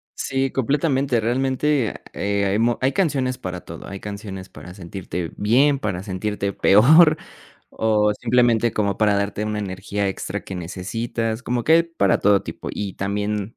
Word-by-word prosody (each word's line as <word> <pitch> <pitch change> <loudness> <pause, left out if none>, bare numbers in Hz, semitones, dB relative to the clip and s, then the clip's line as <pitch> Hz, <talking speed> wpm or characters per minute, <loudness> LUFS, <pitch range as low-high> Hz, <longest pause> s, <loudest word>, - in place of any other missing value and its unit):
Sí, 135 0 -1
completamente, 135 -1 +1
realmente, 130 +2 0 0.2
eh, 100 0 -1
hay 100 +1 +1
mo 120 +1 +2
hay 130 +1 +2
canciones 135 -6 0
para 90 -1 -6
todo. - - -10
Hay 100 - -7
canciones 100 -2 -7
para 90 - -11
sentirte 90 -3 -6
bien, 135 +7 +3
para 100 -8 -3
sentirte 100 +1 -3
peor 155 - +6 0.5
o 105 -1 +2
simplemente, 120 -1 +2
como 100 -2 -1
para 105 -2 +3
darte 100 +1 -2
una 105 0 -2
energía 100 +1 -3
extra 95 - -4
que 95 - -7
necesitas, 110 +6 -3
como 120 -1 -2
que 160 - +3
hay 165 +1 +6
para 165 - +1
todo 100 -1 +4
tipo, - - -7
y 100 -2 -4
también, 105 +2 -3
105 Hz, 160 wpm, -22 LUFS, 100-130 Hz, 0.5 s, peor